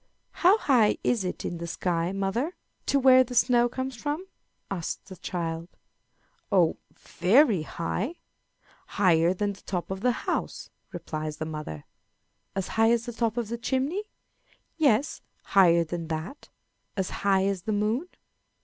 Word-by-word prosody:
"How 370 +4 +4
high 245 - +3
is 235 -5 +1
it 180 - -4
in 170 - -4
the 170 - -5
sky, 170 0 -1
mother, 200 - -1 0.3
to 280 - +3
where 260 -1 +7
the 250 0 -8
snow 240 0 +4
comes 260 +1 -4
from?" 295 +9 -3 0.5
asks 175 -4 -4
the 190 - -8
child. 165 -2 -4 0.8
"Oh, 180 -5 +3 0.2
very 220 - +3
high 185 - -3 0.8
higher 175 -4 +4
than 205 +2 -1
the 200 - -16
top 180 -1 -4
of 190 0 -4
the 250 +2 +3
house," - - -3 0.2
replies 155 -1 -5
the 155 - -3
mother. 150 - -6 0.7
"As 195 -2 -2
high 225 0 +3
as 235 0 +2
the 240 - -5
top 230 0 -1
of 235 -3 -2
the 235 0 -4
chimney?" 275 - -1 0.7
"Yes, 290 -2 +2 0.2
higher 170 -3 +5
than 165 0 -5
that." 160 - -6 0.5
"As 190 -2 -1
high 195 -1 +3
as 195 -2 -1
the 215 - -3
moon?" 215 - 0
200 Hz, 150 wpm, -27 LUFS, 175-250 Hz, 0.8 s, where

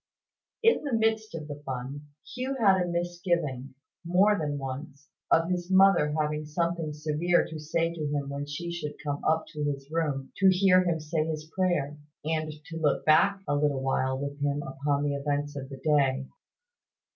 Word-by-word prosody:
In 455 -6 +4
the 285 -4 -3
midst 220 -2 0
of 155 -2 -6
the 145 -1 -7
fun, 135 +2 -5 0.3
Hugh 255 +2 -2
had 195 -4 +5
a 180 - 0
misgiving, 170 -7 -2 0.3
more 185 +5 +4
than 150 -5 -2
once, 140 +2 -7 0.2
of 165 +2 +3
his 175 0 -2
mother 190 -5 +5
having 150 0 -1
something 165 0 -1
severe 155 +4 +1
to 160 -1 -7
say 165 +2 -1
to 155 -3 -3
him 145 -1 -2
when 140 +1 -4
she 170 +4 -4
should 160 -4 -5
come 145 -1 -2
up 160 0 +2
to 150 -2 -5
his 140 0 -3
room, 150 -5 -1
to 195 -1 +6
hear 185 0 +5
him 170 -2 0
say 155 +1 -1
his 155 0 -5
prayer, 150 -6 0 0.3
and 155 -1 -1
to 165 -2 -7
look 150 -3 +1
back 195 +6 +4
a 145 - +1
little 145 -2 +1 0.4
with 140 +1 -5
him 145 0 0
upon 140 +1 -1
the 145 -1 0
events 145 +1 -2
of 135 -1 -6
the 135 - -8
day. 135 -2 +2
155 Hz, 180 wpm, -28 LUFS, 145-175 Hz, 0.4 s, to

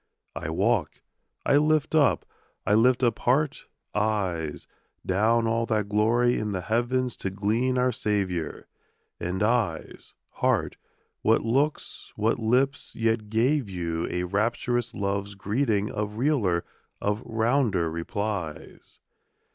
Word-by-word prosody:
I 75 - -4
walk, 100 +1 0 0.4
I 140 - +5
lift 155 0 +2
up, 150 -4 +3 0.4
I 105 - +2
lift 125 +4 +4
up 120 - +2
heart, 140 +4 +1 0.3
eyes, 95 -8 -1 0.4
Down 110 +5 +2
all 115 +1 0
that 105 -2 0
glory 115 +4 +3
in 105 -1 -2
the 95 - -2
heavens 120 +4 0
to 95 - -3
glean 110 +7 0
our 125 0 +3
Saviour; 100 -7 -2 0.5
And, 90 +2 -3
éyes, 105 -7 -1 0.2
heárt, - - +1 0.5
what - - +3
looks, 135 +7 -1
what 110 +2 +1
lips 125 +5 +1
yet 115 -2 0
gave 120 +2 +1
you 85 -3 -2
a 90 - -1
Rapturous 115 +5 -1
love's 100 0 -2
greeting 105 +1 0
of 105 0 -3
realer, 115 - +1 0.3
of 105 +2 -1
rounder 115 -5 +1
replies? 90 -1 -5
110 Hz, 125 wpm, -26 LUFS, 100-120 Hz, 0.5 s, I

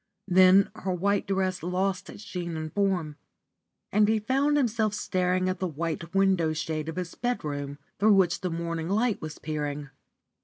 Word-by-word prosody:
Then 185 +1 +6
her 190 - -3
white 200 +3 0
dress 190 -1 0
lost 185 +2 -1
its 205 - -10
sheen 175 -5 -5
and 155 0 -5
form, 185 -7 0 0.7
and 210 +1 +4
he 220 +1 +3
found 270 +7 +1
himself 220 -5 +1
staring 185 -2 0
at 185 0 -1
the 185 - 0
white 165 +2 -4
window 190 -5 +3
shade 155 0 -3
of 160 - -5
his 180 -2 -4
bedroom, 145 - -3 0.2
through 210 +1 +5
which 185 -2 +2
the 185 - -1
morning 165 0 -3
light 220 +2 +1
was 155 -1 -6
peering. 150 -2 -4
185 Hz, 165 wpm, -27 LUFS, 160-200 Hz, 0.7 s, Then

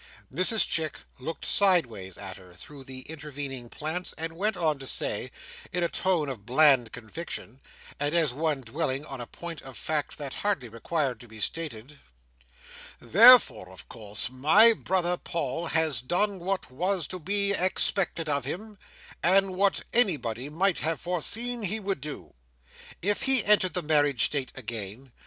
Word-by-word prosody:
Mrs 185 +3 +5
Chick 160 -2 0 0.2
looked 160 +6 -6
sideways 120 - +1
at 95 -2 -7
her, 90 -2 -16
through 140 +8 -11
the 130 0 -8
intervening 140 -4 -7
plants, 160 +7 -4
and 165 +1 -5
went 205 +3 -1
on 155 -4 0
to 135 - -8
say, - - +1 0.4
in 180 0 -1
a 170 - 0
tone 180 -6 0
of 125 -7 -6
bland 130 -1 +4
conviction, 125 +1 -8 0.4
and 145 +3 -1
as 160 -7 +2
one 150 -1 -1
dwelling 135 +3 -3
on 135 -2 -7
a 120 - -7
point 170 -3 -9
of 135 -1 -11
fact 150 -2 -3
that 140 -3 -6
hardly 195 - -2
required 130 +2 -2
to 120 - -13
be 110 -1 -12
stated: 145 0 -4 1.0
"Therefore, 230 - +7
of 95 - -14
course 105 0 -4
my 160 - +6
brother 180 -4 -1
Paul 165 0 -4
has 160 -7 +1
done 190 +9 0
what 185 -4 -3
was 180 +5 -1
to 185 - -5
be 200 +4 0
expected 185 -3 +1
of 140 -2 -1
him, 205 - -7 0.4
and 190 +1 +3
what 195 +1 +1
anybody 145 - +2
might 180 +4 0
have 160 +1 -2
foreseen 225 +8 -1
he 210 +2 -2
would 195 -8 -3
do, 150 +1 -8 0.7
if 205 +2 0
he 265 -4 +5
entered 195 -4 +3
the 180 - 0
marriage 145 -5 +2
state 140 -3 -2
again. 115 +1 -7
155 Hz, 160 wpm, -27 LUFS, 130-185 Hz, 1.0 s, Therefore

